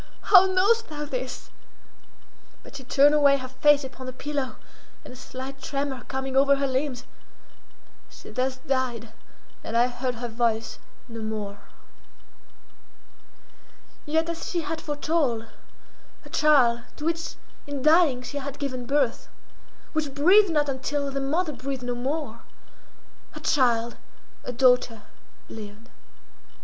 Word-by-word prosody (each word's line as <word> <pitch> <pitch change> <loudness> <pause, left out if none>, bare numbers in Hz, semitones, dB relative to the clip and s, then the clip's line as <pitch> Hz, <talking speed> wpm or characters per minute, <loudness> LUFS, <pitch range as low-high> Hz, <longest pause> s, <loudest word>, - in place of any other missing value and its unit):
how 380 0 +10
knowest 405 +5 +2
thou 295 -1 -5
this?" - - -5 1.1
but - - -13
she 270 - -7
turned 285 +3 +5
away 285 -2 +5
her 255 -1 -6
face 285 +3 +3
upon 260 0 -8
the - - -4
pillow 275 0 -4 0.5
and - - -10
a - - -12
slight 265 +2 -8
tremor 275 -2 -3
coming 265 0 -4
over 280 +1 +5
her 275 0 -1
limbs, 260 -1 -2 1.1
she - - -13
thus 255 +1 -1
died, 245 -4 -2 0.5
and 230 - -2
I 240 - +5
heard 250 0 -3
her 240 +1 -4
voice 230 -1 -1 0.3
no 230 -2 -8
more. 210 -2 -5 2.5
Yet, 320 +2 +1
as 335 0 -5
she 345 - -1
had 320 0 -4
foretold, 290 -6 -1 0.8
her - - -14
child, 260 -6 +4
to 300 - -7
which 330 0 -2 0.3
in 285 -2 -4
dying 305 -5 +4
she 285 +3 -5
had 280 0 -6
given 255 -4 -4
birth, 275 -3 0 0.6
which 300 -4 -2
breathed 375 +8 +6
not 300 -3 +1
until 280 +1 -2
the 275 0 -2
mother 305 +4 0
breathed 265 -1 -5
no 245 0 -2
more, 260 0 -3 0.9
her 305 - -8
child, 240 -6 +1 0.5
a - - -4
daughter, 250 -3 +3 0.4
lived. 220 +1 -10
270 Hz, 135 wpm, -25 LUFS, 245-295 Hz, 2.5 s, how